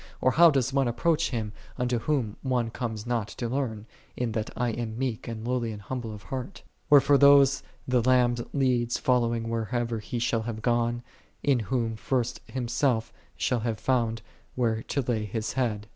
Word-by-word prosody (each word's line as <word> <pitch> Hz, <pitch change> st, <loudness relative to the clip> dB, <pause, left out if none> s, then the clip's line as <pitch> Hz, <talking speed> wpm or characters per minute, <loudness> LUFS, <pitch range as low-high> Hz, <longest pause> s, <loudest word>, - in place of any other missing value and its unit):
or 130 Hz, -, +3 dB
how 170 Hz, +5 st, +7 dB
doth 135 Hz, -3 st, +1 dB
one 135 Hz, -2 st, +2 dB
approach 160 Hz, +7 st, +1 dB
Him, 110 Hz, -4 st, -3 dB, 0.2 s
unto 125 Hz, -2 st, 0 dB
Whom 120 Hz, -6 st, -1 dB
one 125 Hz, -4 st, 0 dB
conies 110 Hz, -3 st, -4 dB
not 120 Hz, -3 st, -1 dB
to 120 Hz, -, -2 dB
learn, 115 Hz, -4 st, -2 dB, 0.2 s
" -, -, -31 dB
in 120 Hz, -2 st, -1 dB
that 110 Hz, 0 st, -2 dB
I 120 Hz, -1 st, +1 dB
am 115 Hz, -1 st, -4 dB
meek 125 Hz, -4 st, -3 dB
and 115 Hz, 0 st, -5 dB
lowly 120 Hz, -2 st, 0 dB
of 105 Hz, 0 st, -6 dB
heart? 130 Hz, +8 st, -6 dB
" -, -, -41 dB
Wherefore 145 Hz, -1 st, +6 dB
those 140 Hz, -1 st, +6 dB, 0.3 s
the 125 Hz, -1 st, +3 dB
Lamb 125 Hz, 0 st, +4 dB, 0.2 s
leadeth 125 Hz, -4 st, +1 dB
following 120 Hz, -2 st, +1 dB
whitherso 115 Hz, 0 st, -3 dB
ever 120 Hz, -2 st, -1 dB
He 115 Hz, +3 st, -5 dB
shall 115 Hz, -1 st, 0 dB
have 110 Hz, -1 st, -5 dB
gone, 120 Hz, 0 st, +1 dB, 0.4 s
in 140 Hz, -4 st, +3 dB
whom 115 Hz, 0 st, -1 dB
first 125 Hz, +1 st, -1 dB
Him 130 Hz, -2 st, -3 dB
self 120 Hz, -2 st, 0 dB, 0.2 s
shall 125 Hz, -, +1 dB
have 110 Hz, -1 st, -2 dB
found 115 Hz, -4 st, 0 dB, 0.3 s
where 115 Hz, -3 st, +1 dB
to 140 Hz, -, -2 dB
lay 115 Hz, -4 st, -1 dB
His 110 Hz, +2 st, -3 dB
Head. 110 Hz, -6 st, -1 dB
120 Hz, 185 wpm, -27 LUFS, 115-130 Hz, 0.4 s, how